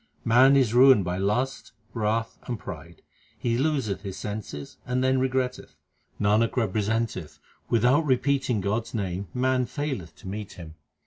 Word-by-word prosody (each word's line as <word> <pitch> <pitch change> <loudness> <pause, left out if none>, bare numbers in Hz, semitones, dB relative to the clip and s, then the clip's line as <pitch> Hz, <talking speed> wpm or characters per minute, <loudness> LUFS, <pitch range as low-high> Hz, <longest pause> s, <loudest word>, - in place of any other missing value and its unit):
Man 130 +4 +6
is 125 -5 +2
ruined 125 -5 +6
by 90 +1 -2
lust, 125 +8 -1 0.2
wrath, 115 0 -1
and 120 - -2
pride; 85 -3 -10 0.3
he 115 -1 -1
loseth 130 -8 0
his 95 -2 -6
senses 100 -9 -6
and 125 0 -1
then 130 0 +3
regretteth. 130 -1 -2 0.4
Nanak 105 +4 +2
representeth 110 -5 -1 0.3
without 125 +7 +3
repeating 130 -4 +1
God 100 +4 0
s - - -12
name 95 -2 -3
man 130 0 +1
faileth 130 - -4
to - - -13
meet 105 +1 -6
Him. 80 -3 -10
115 Hz, 145 wpm, -26 LUFS, 100-130 Hz, 0.4 s, Man